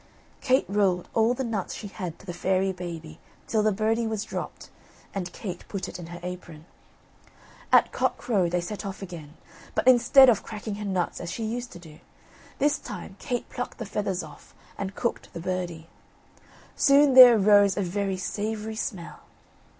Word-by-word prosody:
Kate 260 0 +3
rolled 195 -3 +1
all 225 +2 +3
the 265 - -2
nuts 220 -6 -3
she - - -8
had 185 -5 -6
to - - -17
the 175 - -5
fairy 190 +2 +1
baby 170 -3 -8 0.3
till 220 - +1
the 215 0 +3
birdie 225 +3 0
was 220 -2 -2
dropped, - - -7 0.4
and 180 -3 -4
Kate 180 -4 -7
put 195 -2 -4
it 180 - -8
in 170 - -8
her 175 +1 -8
apron. 175 -3 -8 1.1
At - - +5
cockcrow 195 -8 0
they 180 +1 0
set 205 +5 -6
off 195 -1 -6
again, 165 -5 -9 0.4
but - - 0
instead 255 +2 +7
of 230 -5 +4
cracking 215 -1 -6
her - - -4
nuts 185 -3 -2
as 170 - -5
she 230 - -4
used 240 +2 -4
to - - -9
do, 160 -3 -14 0.6
this 290 +1 +2
time 190 - -8
Kate 245 -1 -3
plucked 245 - -6
the 225 - -5
feathers 195 -3 -2
off 155 -2 -14 0.2
and 195 0 -5
cooked 235 - -3
the 170 - -6
birdie. 175 -2 -4 0.9
Soon 280 -1 +5
there 250 -3 +10
arose 205 -1 +5
a 200 - +1
very 195 +1 -2
savoury 215 +3 -4
smell. 190 -7 -5
200 Hz, 175 wpm, -26 LUFS, 180-225 Hz, 1.1 s, there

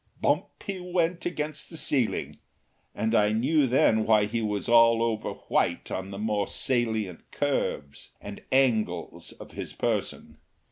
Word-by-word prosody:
Bump - - -1
he 195 -3 -4
went 180 -1 -1
against 150 -3 -4
the 165 - -8
ceiling, 130 -7 0 0.6
and 110 0 -1
I 105 0 +3
knew 135 +6 +2
then 110 -3 +3
why 110 -1 +4
he 115 +2 -2
was 105 -1 -2
all 115 -1 +5
over 110 -2 -2
white - - 0
on 95 +1 -4
the 100 - -7
more 105 -1 -1
salient 110 -8 -1
curves 135 - -2
and - - -9
angles 110 -10 0
of - - -12
his - - -7
person. - - -3
115 Hz, 145 wpm, -27 LUFS, 105-145 Hz, 0.6 s, all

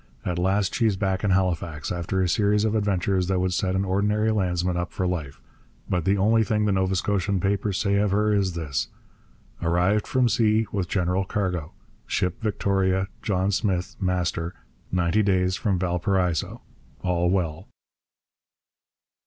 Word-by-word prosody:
At 90 -1 -1
last 95 +2 +1
she's 110 -4 +2
back 95 -1 -1
in 105 - +1
Halifax, 85 -5 0
after 90 +2 -1
a - - +1
series 105 +2 +2
of 110 - +1
adventures 95 -3 +1
that 95 -1 +1
would 90 0 0
set 95 +1 0
an 95 +1 0
ordinary 105 +3 +1
landsman 90 -3 0
up 85 0 -2
for 95 - -2
life. 80 -7 -3 0.5
But 90 -3 -1
the 100 +1 +3
only 110 +3 +3
thing 105 -1 0
the 105 - +2
Nova 95 0 +1
Scotian 100 0 0
papers 100 +1 0
say 100 -1 +1
of 105 0 +2
her 105 +2 +2
is 95 -4 +1
this: 75 -6 -2 0.7
'Arrived 90 +5 +1
from 130 -2 +2
sea 110 -1 +2
with 95 -4 -2
general 90 0 +1
cargo 90 -5 -2 0.3
ship 90 -1 -1
Victoria, 95 -3 0
John 95 -1 0
Smith, 95 -3 -1
master, 90 -2 -1 0.4
ninety 90 +3 +2
days 95 -2 +2
from 100 -2 0
Valparaiso. 90 -1 0 0.4
All 90 -1 +1
well.' 90 -1 -1
95 Hz, 155 wpm, -25 LUFS, 90-100 Hz, 0.7 s, the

